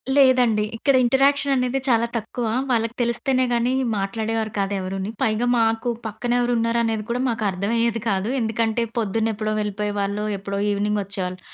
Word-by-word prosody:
లేదండి. 250 -6 +4
ఇక్కడ 275 +4 +2
ఇంటరాక్షన్ 275 +2 +3
అనేది 250 +1 0
చాలా 235 -2 +3
తక్కువ. 230 +2 -4 0.3
వాళ్ళకి 230 0 0
తెలిస్తేనే 255 +2 +1
గాని 240 +2 +1 0.2
మాట్లాడేవారు 220 +2 -2
కాదు 195 0 0
ఎవరుని. 190 +2 -4
పైగా 220 +2 +1
మాకు 225 +1 +1 0.2
పక్కనెవరున్నారు 235 +1 0
అనేది 220 -2 -1
కూడా 245 +2 -1
మాకు 230 -1 -2
అర్థమయ్యేది 230 +4 0
కాదు. 195 +1 0
ఎందుకంటే 225 +1 0 0.2
పొద్దున్న 225 +1 0
ఎప్పుడో 215 0 -2
వెళ్ళిపోయేవాళ్ళు. 205 0 -2
ఎప్పుడో 200 0 -4
ఈవినింగ్ 205 +1 0
వచ్చేవాళ్ళు. 185 -2 -3
225 Hz, 140 wpm, -22 LUFS, 210-240 Hz, 0.3 s, లేదండి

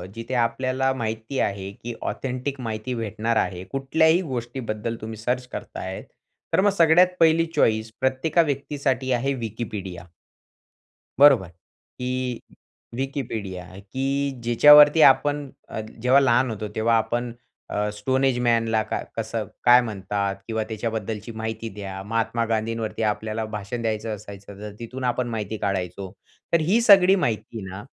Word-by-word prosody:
जिथे 115 +3 -6
आपल्याला 130 +3 -1
माहिती 110 +4 -3
आहे 100 -1 -2
की 120 0 -4 0.2
ऑथेंटिक 130 +1 -4
माहिती 115 +1 -4
भेटणार 115 0 -2
आहे. 90 -1 -1
कुठल्याही 160 - +2
गोष्टीबद्दल 120 - -4
तुम्ही 110 0 -6
सर्च 125 +3 -2
करताय, 95 0 -6 0.5
तर - - +4
मग 205 0 +4
सगळ्यात 175 +3 +5
1ली 165 0 +5
चॉइस 110 0 +2
प्रत्येका 130 +6 +2
व्यक्तीसाठी 135 -2 -2
आहे 130 +3 +1
Wikipedia. 100 -6 -6 1.1
बरोबर? 135 -9 +7 0.5
की 125 -1 -2 0.6
Wikipedia 115 -9 -4 0.2
की 135 +6 -2
जिच्यावरती 150 +6 +7
आपण 145 +1 +5 0.3
अ, - - -5 0.2
जेव्हा 125 +3 +5
लहान 130 -1 +3
होतो 105 -1 -4
तेव्हा 115 +1 +2
आपण 120 +2 -1 0.4
अ, 105 0 -1
स्टोनएजमॅनला 120 -1 +1
काय - - -4
कसं 110 -1 -3 0.2
काय 125 +1 +7
म्हणतात? 100 -2 -3
किंवा 110 -1 -1
त्याच्याबद्दलची 110 0 -4
माहिती 110 0 -5
द्या. 95 -2 -6
महात्मा 115 +2 -1
गांधींवरती 115 0 -2
आपल्याला 110 +1 -1
भाषण 105 +4 -5
द्यायचं 110 -1 -2
असायचं 100 -1 -11
तर 105 -1 -6
तिथून 125 +3 -7
आपण 125 0 0
माहिती 110 -1 -4
काढायचो. 95 -2 -3 0.4
तर 170 - +5
ही 185 +9 +3
सगळी 195 -4 +7
माहिती 115 - -2
ना 95 +2 -8
115 Hz, 130 wpm, -24 LUFS, 110-130 Hz, 1.1 s, बरोबर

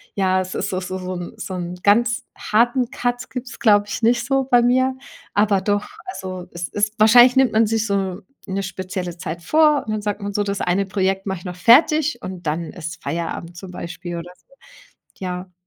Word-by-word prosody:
Ja, 185 -1 +2
es 185 0 -6
ist - - -2
doch 185 - -1
so 185 +1 -4
so 185 0 -5
'n 175 -1 -6
so 190 - -6
'n 175 0 -4
ganz 235 +4 +3
harten 240 +3 +2
Cut 245 0 -2
gibt 250 0 -6
es, - - -11
glaube 205 -2 +4
ich, - - -4
nicht 235 +1 +3
so 270 +1 +1
bei 245 -2 +4
mir. 260 +2 +2 0.4
Aber 205 -2 +3
doch, 205 +1 0 0.2
also, 185 - -6
es 170 0 -4
ist 210 +1 -1
wahrscheinlich 240 +4 +7
nimmt 265 -1 +4
man 220 0 +4
sich 225 0 0
so 195 -1 -1 0.3
'ne 195 +1 -2
spezielle 185 -1 -5
Zeit 170 +1 -6
vor 300 - +4
und 215 - -4
dann 215 - -2
sagt 205 0 -3
man 200 0 -4
so: 205 - 0
„Das 200 -1 -3
eine 190 +3 +1
Projekt 195 -1 0
mach 190 -1 -2
ich 170 - -14
noch 180 0 -5
fertig 300 - +4
und 180 -3 -6
dann 160 +2 -2
ist 165 -2 -7
Feierabend 170 +1 -4
zum 190 0 -9
Beispiel 175 0 -6
oder 175 +1 -7
so.“ - - -27 0.6
Ja. 180 0 -5
200 Hz, 210 wpm, -21 LUFS, 180-235 Hz, 0.6 s, wahrscheinlich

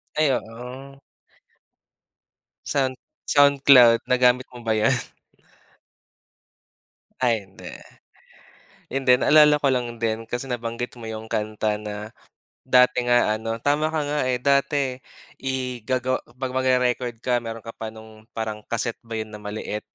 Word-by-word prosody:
Ay, 155 -2 +3
oo. 125 +4 -7 1.7
Sound 130 -2 0 0.3
SoundCloud 140 -5 +6
nagamit 125 0 +3
mo 125 - -10
ba 110 - +2
yun? 110 +4 +3 2.3
Ay 115 -4 +2
hindi. - - -12 1.3
Yun 135 - 0
din 125 -1 +5
naalala 150 -1 +6
ko 145 - -3
lang 120 -2 -3
din, 115 0 -2
kasi 120 +2 -3
nabanggit 120 -1 -4
mo 115 -1 -8
yung 110 0 -6
kanta 110 0 -2
na 105 +1 -7 0.5
dati 125 -1 +4
nga 120 -3 +3
ano, 115 +1 -3
tama 150 +3 +1
ka 155 - 0
nga, 145 +1 -1
eh, 125 - +1
dati 140 0 +1 0.4
i 130 -2 -3
gagawa 130 +2 -1 0.2
'pag 130 -1 -4
mag-re-record 125 -2 +1
ka 120 +1 0
meron 115 0 -7
ka 115 - -7
pa 110 - -6
nung 110 0 -14
parang 110 -1 -4
casette 115 0 -2
ba 115 -1 -6
yun 110 0 -5
na 105 - -9
maliit, 105 0 -5
125 Hz, 135 wpm, -23 LUFS, 110-130 Hz, 2.3 s, SoundCloud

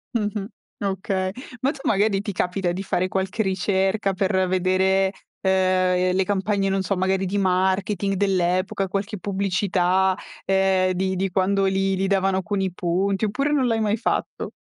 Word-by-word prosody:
Mh-mh, 210 -2 -1 0.4
okay. 190 -1 -1 0.3
Ma 270 +2 +2
tu, - - -11
magari 200 -1 +2
ti 205 - -4
capita 180 0 -1
di 190 +3 -4
fare 185 -1 0
qualche 190 +3 -2
ricerca 195 +1 0
per 190 0 +1
vedere, 190 +1 +2 0.3
ehm, 185 -1 +2
le 190 - +3
campagne, 195 0 0
non 195 0 0
so, 195 - -1
magari 190 +1 0
di 200 +2 -1
marketing 190 +1 +1
dell'epoca, 190 0 0
qualche 200 +2 -3
pubblicità, 190 -1 +1 0.3
ehm, 190 -1 +2
di 190 +1 -1
di 190 +1 -1
quando 195 +1 +1
li 195 0 +1
li 190 - -1
davano 190 -1 +1
con 205 -1 -2
i 190 -1 -1
punti 190 +4 0
oppure 275 +8 -1
non 280 -3 +2
l'hai 225 -2 +1
mai 215 0 +1
fatto? 230 - -2
190 Hz, 160 wpm, -23 LUFS, 185-200 Hz, 0.4 s, le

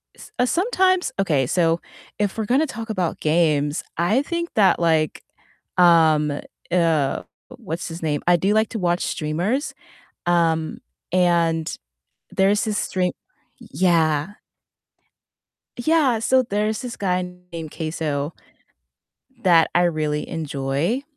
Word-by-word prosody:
s - - -14
uh, 250 - +4
sometimes 370 - +1
Okay, 150 -9 +1
so 165 +1 +1 0.4
if 205 +1 -1
we're 220 - -1
gonna 275 +7 +2
talk 225 -2 -7
about 185 -6 -2
games, 150 -1 +1
I 190 - +2
think 340 +2 -3
that, 200 -5 +4
like, 160 -3 +1 0.5
um, 160 -4 +5 0.4
uh, 160 -6 +1 0.3
what's 175 -8 -5
his 165 +1 -7
name? 145 -2 -1
I 175 - +6
do 195 +4 +1
like 220 0 +2
to - - -5
watch 175 -1 0
streamers. 175 - -2 0.5
Um, 165 -2 +1 0.3
and 170 -3 +2 0.6
there's 200 +2 +2
this 215 -2 -1
stream 180 -1 -1 0.5
Yeah. 165 +1 +1 1.4
Yeah, 265 -4 +2
so 260 +3 +3
there's 215 -1 -1
this 245 -2 -6
guy 185 -2 0 0.3
named 165 -3 -6
CaseOh 155 -2 -3 1.1
that 170 -4 +5
I 175 - +4
really 155 -3 0
enjoy. 150 - -2
175 Hz, 120 wpm, -22 LUFS, 160-215 Hz, 1.4 s, I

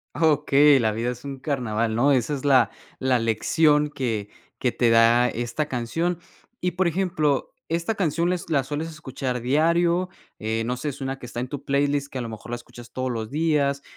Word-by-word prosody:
Ah, 165 - +2
okey, 145 -1 +5
la 110 -2 +2
vida 115 +3 -1
es 125 0 -9
un 140 -1 -6
carnaval, 115 -5 -1
¿no? 135 +5 +3
Esa 130 +2 +1
es 140 -1 -4
la 130 -6 +4 0.3
la 130 -2 +2
lección 150 +7 +2
que 115 -8 -3 0.3
que 125 - 0
te 120 -2 +2
da 115 +2 +5
esta 120 +6 -3
canción. 165 +8 -1 0.4
Y, 180 0 0
por 180 +1 +1
ejemplo, 165 -5 0 0.2
¿esta 170 +6 0
canción 170 -3 0
les 175 -2 -3
la 140 -4 +2
sueles 150 +4 -4
escuchar 135 -5 -4
diario, 170 +7 +2 0.3
eh, 110 +1 -1
no 125 +1 -2
sé, 145 +3 -3
suena 135 -1 -5
que 125 - -9
está 120 - -6
en 125 - -3
tu 140 +1 -6
playlist, 140 0 +1
que 130 - -5
a - - -2
lo 115 - -5
mejor 110 +1 -9
la 120 - -2
escuchas 120 0 -12
todos 130 0 -2
los 110 -2 -4
días, 145 -2 +1
135 Hz, 200 wpm, -24 LUFS, 120-155 Hz, 0.4 s, okey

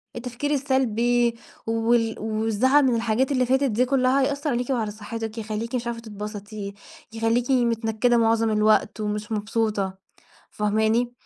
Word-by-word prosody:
التفكير 250 +4 -4
السلبي 245 -4 +1 0.3
وال 225 0 +1
والزعل 225 +6 +2
من 245 -2 +2
الحاجات 235 +4 0
اللي 255 -2 +2
فاتت 265 +3 +2
دي 245 +4 +2
كلّها 265 +1 +2
هيأثّر 285 +2 -1
عليكِ 245 0 -1
وعلى 225 -5 0
صحّتِك، 220 +1 -6
يخلّيكِ 225 +2 -4
مش 240 -1 -2
عارفة 235 -1 -3
تتبسطي، 210 -1 -7 0.4
يخلّيكِ 230 +3 0
متنكّدة 235 -1 +2
مُعظم 225 0 +2
الوقت 215 0 +2
ومش 210 +1 -3
مبسوطة 210 -2 -1 0.5
فاهماني. 220 +3 +1
230 Hz, 135 wpm, -24 LUFS, 215-245 Hz, 0.5 s, والزعل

